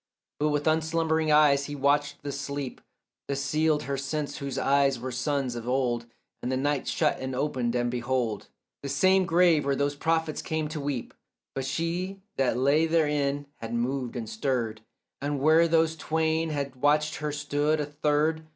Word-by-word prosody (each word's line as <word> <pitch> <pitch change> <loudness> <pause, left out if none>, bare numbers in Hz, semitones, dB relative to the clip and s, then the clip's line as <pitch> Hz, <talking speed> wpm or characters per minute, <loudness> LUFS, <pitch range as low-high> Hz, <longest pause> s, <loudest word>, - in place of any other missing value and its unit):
But 150 +1 +2
with 145 0 0
unslumbering 160 0 +1
eyes 145 -2 +5
he 145 - -5
watched 145 +1 +1
the 145 - -3
sleep 140 -1 -5 0.5
That 140 - -1
sealed 150 +2 +1
her 140 +1 -2
sense 145 +2 -3
whose 140 -1 -4
eyes 140 -2 +2
were 130 +2 -4
suns 130 +1 -1
of 120 0 -6
old; 125 -2 0 0.3
And 125 - -2
the 130 - 0
night 145 0 0
shut - - +1
and 130 0 -4
opened, 125 -3 -1
and 120 0 0
behold, 120 -3 -1 0.3
The 140 - -5
same 185 +7 +3
grave 170 -3 +4
where 140 0 +1
those 140 +1 0
prophets 160 +1 0
came 160 -1 -2
to 155 -1 -4
weep, 140 -4 -3 0.4
But 135 - -3
she 175 +7 -2
that 130 -3 +1
lay 145 +5 +3
therein 145 -3 +1
had 115 +1 -5
moved 125 +1 -2
and 115 -3 -4
stirred, 115 -2 -2 0.4
And 145 0 -1
where 160 +4 +5
those 160 -1 +2
twain 160 +1 0
had 140 -3 -3
watched 150 +3 +2
her 150 0 -2
stood 150 +1 0
a 150 - 0
third. 150 +2 0
145 Hz, 175 wpm, -27 LUFS, 130-155 Hz, 0.5 s, eyes